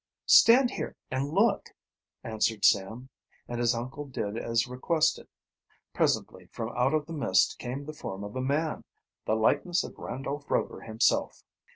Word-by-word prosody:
"Stand 245 Hz, +2 st, +7 dB
here -, -, -5 dB, 0.2 s
and 130 Hz, +2 st, -1 dB
look," 200 Hz, +6 st, +2 dB, 0.5 s
answered 110 Hz, -1 st, 0 dB
Sam, 110 Hz, +6 st, +2 dB, 0.4 s
and 120 Hz, 0 st, -4 dB
his 120 Hz, 0 st, +2 dB
uncle 130 Hz, +5 st, -5 dB
did 110 Hz, -6 st, -4 dB
as 115 Hz, 0 st, 0 dB
requested. 140 Hz, +6 st, 0 dB, 0.7 s
Presently -, -, -1 dB
from 115 Hz, +1 st, -6 dB
out 130 Hz, +5 st, +2 dB
of 150 Hz, -1 st, 0 dB
the 165 Hz, -, -8 dB
mist 95 Hz, -11 st, +2 dB
came 130 Hz, +3 st, -5 dB
the 155 Hz, -, -7 dB
form 100 Hz, -9 st, -7 dB
of 105 Hz, +2 st, -8 dB
a 130 Hz, -, -2 dB
man 150 Hz, +4 st, -1 dB, 0.4 s
the 110 Hz, -, +1 dB
likeness 145 Hz, +10 st, +1 dB
of -, -, -10 dB
Randolph 140 Hz, +3 st, -5 dB
Rover -, -, -1 dB
himself! 110 Hz, 0 st, 0 dB
130 Hz, 155 wpm, -28 LUFS, 115-150 Hz, 0.7 s, Stand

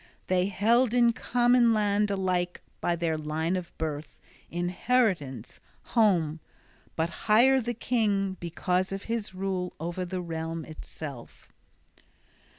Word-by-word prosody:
They 185 Hz, 0 st, +2 dB
held 230 Hz, +5 st, +3 dB
in 235 Hz, -1 st, +5 dB
common 240 Hz, -1 st, +3 dB
land 210 Hz, 0 st, +2 dB
alike 185 Hz, -2 st, -1 dB, 0.2 s
by 175 Hz, -, +1 dB
their 165 Hz, -2 st, -1 dB
line 160 Hz, +3 st, -1 dB
of 180 Hz, -2 st, -4 dB
birth, 155 Hz, -1 st, -4 dB, 0.3 s
inheritance, 175 Hz, -, 0 dB, 0.3 s
home: 175 Hz, -9 st, +3 dB, 0.6 s
but 170 Hz, +6 st, -3 dB
higher 260 Hz, +5 st, +6 dB
the 240 Hz, +1 st, -3 dB
king 205 Hz, -5 st, 0 dB
because 180 Hz, +2 st, -1 dB
of 195 Hz, 0 st, -4 dB
his 225 Hz, -4 st, -3 dB
rule 185 Hz, -1 st, -2 dB
o'er 175 Hz, +3 st, -3 dB
the 180 Hz, +1 st, -4 dB
realm 165 Hz, -1 st, -4 dB
itself. 150 Hz, -4 st, -9 dB
185 Hz, 120 wpm, -28 LUFS, 165-220 Hz, 0.6 s, higher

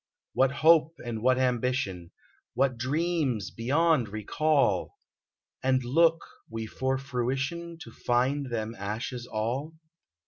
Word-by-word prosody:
What 135 Hz, 0 st, +4 dB
hope 160 Hz, +2 st, +4 dB
and 115 Hz, -2 st, -4 dB
what 130 Hz, +2 st, +3 dB
ambition. 125 Hz, -8 st, -1 dB, 0.5 s
What 135 Hz, -1 st, +2 dB
dreams 135 Hz, -, -1 dB
beyond 140 Hz, +1 st, +2 dB
recall! 110 Hz, -, +1 dB, 0.6 s
And 130 Hz, -1 st, +2 dB
look 165 Hz, +6 st, +3 dB, 0.2 s
we 115 Hz, 0 st, -4 dB
for 130 Hz, +4 st, -1 dB
fruition. 135 Hz, +6 st, -3 dB
To 115 Hz, -, -12 dB
find 130 Hz, +5 st, 0 dB
them 115 Hz, -2 st, -3 dB
ashes 115 Hz, +5 st, -4 dB
all 125 Hz, +9 st, -3 dB
130 Hz, 110 wpm, -28 LUFS, 115-145 Hz, 0.6 s, What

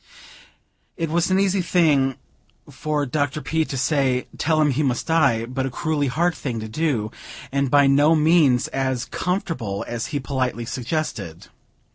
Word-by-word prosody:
It 165 Hz, -2 st, -2 dB
was 170 Hz, +2 st, +1 dB
an 190 Hz, 0 st, +3 dB
easy 195 Hz, -1 st, +2 dB
thing 150 Hz, -7 st, +2 dB, 0.5 s
for 150 Hz, -1 st, -2 dB
Dr. 145 Hz, +1 st, -1 dB
P. 160 Hz, +1 st, 0 dB
to 135 Hz, -, -5 dB
say: 130 Hz, -2 st, +1 dB
"Tell 155 Hz, 0 st, +2 dB
him 150 Hz, -2 st, +3 dB
he 135 Hz, +4 st, 0 dB
must 130 Hz, -4 st, 0 dB
die," 140 Hz, -9 st, +2 dB
but 130 Hz, +2 st, -3 dB
a -, -, -3 dB
cruelly 145 Hz, +2 st, -1 dB
hard 170 Hz, +7 st, +1 dB
thing 125 Hz, -7 st, -4 dB
to 110 Hz, -, -5 dB
do, 110 Hz, -4 st, -1 dB, 0.4 s
and 140 Hz, 0 st, 0 dB
by 145 Hz, +1 st, +5 dB
no 145 Hz, +4 st, +4 dB
means 155 Hz, -5 st, +4 dB
as 130 Hz, -2 st, -1 dB
"comfortable" 165 Hz, -, -3 dB
as 120 Hz, -1 st, -3 dB
he 145 Hz, -2 st, -3 dB
politely 125 Hz, -2 st, -2 dB
suggested. 120 Hz, -, -4 dB
140 Hz, 160 wpm, -22 LUFS, 125-160 Hz, 0.5 s, by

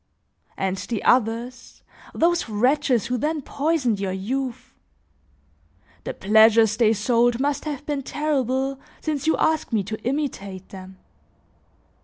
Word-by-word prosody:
And 190 Hz, 0 st, -1 dB
the 220 Hz, +1 st, -4 dB
others, 240 Hz, +1 st, 0 dB, 0.3 s
those 340 Hz, -6 st, +1 dB
wretches 250 Hz, +2 st, +2 dB
who 250 Hz, 0 st, -2 dB
then 305 Hz, +1 st, -1 dB
poisoned 275 Hz, -8 st, 0 dB
your 195 Hz, -1 st, -2 dB
youth! 240 Hz, +7 st, -4 dB, 1.3 s
The -, -, -3 dB
pleasures 220 Hz, +1 st, +5 dB
they 225 Hz, -2 st, +3 dB
sold 235 Hz, +2 st, +2 dB
must 285 Hz, +2 st, -1 dB
have 290 Hz, -2 st, -5 dB
been 290 Hz, -2 st, -2 dB
terrible 270 Hz, -2 st, -1 dB, 0.2 s
since 305 Hz, -1 st, -3 dB
you 320 Hz, -, +3 dB
ask 315 Hz, -3 st, +1 dB
me 215 Hz, -3 st, +1 dB
to 215 Hz, +3 st, -6 dB
imitate 220 Hz, -9 st, -3 dB
them! 190 Hz, 0 st, -11 dB
245 Hz, 125 wpm, -23 LUFS, 215-285 Hz, 1.3 s, pleasures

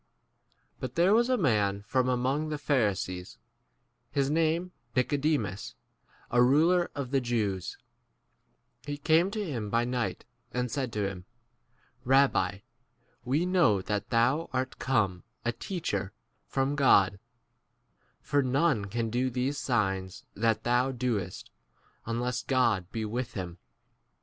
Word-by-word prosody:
But 130 Hz, -1 st, -5 dB
there 175 Hz, +4 st, +4 dB
was 235 Hz, +3 st, +4 dB
a 255 Hz, -, +3 dB
man 105 Hz, -, +1 dB
from 130 Hz, +3 st, +1 dB
among 130 Hz, +5 st, 0 dB
the 150 Hz, -, -2 dB
Pharisees, 100 Hz, -10 st, -1 dB, 0.7 s
his 140 Hz, 0 st, 0 dB
name 165 Hz, +3 st, +1 dB, 0.2 s
Nicodemus, 135 Hz, -7 st, 0 dB, 0.6 s
a 120 Hz, -, +4 dB
ruler 165 Hz, +8 st, +4 dB
of 135 Hz, -3 st, -4 dB
the 135 Hz, -1 st, +2 dB
Jews; 105 Hz, -6 st, -2 dB, 1.1 s
2 145 Hz, -, -2 dB
he -, -, -4 dB
came 160 Hz, +5 st, +3 dB
to 215 Hz, -, -6 dB
him° 135 Hz, -, -3 dB
by 115 Hz, +2 st, +1 dB
night, 125 Hz, -1 st, -2 dB, 0.3 s
and 125 Hz, -1 st, -2 dB
said 130 Hz, -4 st, -2 dB
to 105 Hz, -2 st, 0 dB
him, 90 Hz, -2 st, -7 dB, 0.8 s
Eabbi, 120 Hz, -7 st, +3 dB, 0.6 s
we 140 Hz, +8 st, +1 dB
know 175 Hz, -, +3 dB
that 105 Hz, 0 st, -2 dB
thou 125 Hz, +8 st, +2 dB
art 130 Hz, 0 st, -2 dB
come 105 Hz, -9 st, +1 dB, 0.2 s
a 120 Hz, -, +2 dB
teacher 115 Hz, -, -3 dB, 0.3 s
from 135 Hz, +1 st, 0 dB
God, 100 Hz, -9 st, +4 dB, 1.0 s
for 145 Hz, -, +2 dB
none 135 Hz, -3 st, +2 dB
can 115 Hz, +2 st, -2 dB
do 125 Hz, +2 st, +1 dB
these 130 Hz, +4 st, -1 dB
signs 95 Hz, -8 st, -1 dB
that 115 Hz, 0 st, +1 dB
thou* 125 Hz, +2 st, +2 dB
doest 115 Hz, -8 st, -3 dB, 0.6 s
unless 120 Hz, +2 st, -1 dB
God 115 Hz, -9 st, +1 dB
be 115 Hz, -, -3 dB
3 -, -, -2 dB
with 120 Hz, +3 st, -3 dB
him. 90 Hz, -3 st, -5 dB
125 Hz, 135 wpm, -29 LUFS, 105-145 Hz, 1.1 s, there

